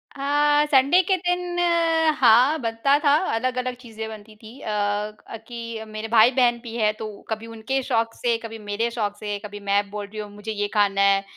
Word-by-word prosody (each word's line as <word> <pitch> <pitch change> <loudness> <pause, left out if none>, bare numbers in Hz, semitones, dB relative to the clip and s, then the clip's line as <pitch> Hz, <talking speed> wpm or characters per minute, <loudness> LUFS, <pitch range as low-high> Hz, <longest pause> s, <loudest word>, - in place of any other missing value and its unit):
हाँ, 290 +1 +2
संडे 280 +7 +5
के 380 +2 +2
दिन 355 0 -2
अ, 330 -2 +2
हाँ 255 +6 +5
बनता 230 +5 +2
था। 285 0 +6 0.2
अलग-अलग 255 +1 -2
चीज़ें 225 -3 -8
बनती 215 0 -11
थीं 225 +5 -14
अ, - - -8
क 210 +1 -3
कि 230 -2 -6
मेरे 215 +1 -6
भाई-बहन 240 +2 +4
भी 230 -1 -8
हैं 215 -2 +2
तो - - -4 0.2
कभी 220 0 -4
उनके 230 +4 -3
शौक 230 -3 0
से, 235 -2 0
कभी 225 0 -7
मेरे 210 +2 -2
शौक 210 -3 -2
से, 205 -1 -3
कभी 205 0 -8
मैं 200 0 0
बोल 205 0 -5
रही 215 +1 -9
हूँ 210 -1 -6
मुझे 210 +2 -6
ये 205 -1 -2
खाना 200 -2 +2
है। 195 0 +4
230 Hz, 195 wpm, -23 LUFS, 210-265 Hz, 0.2 s, था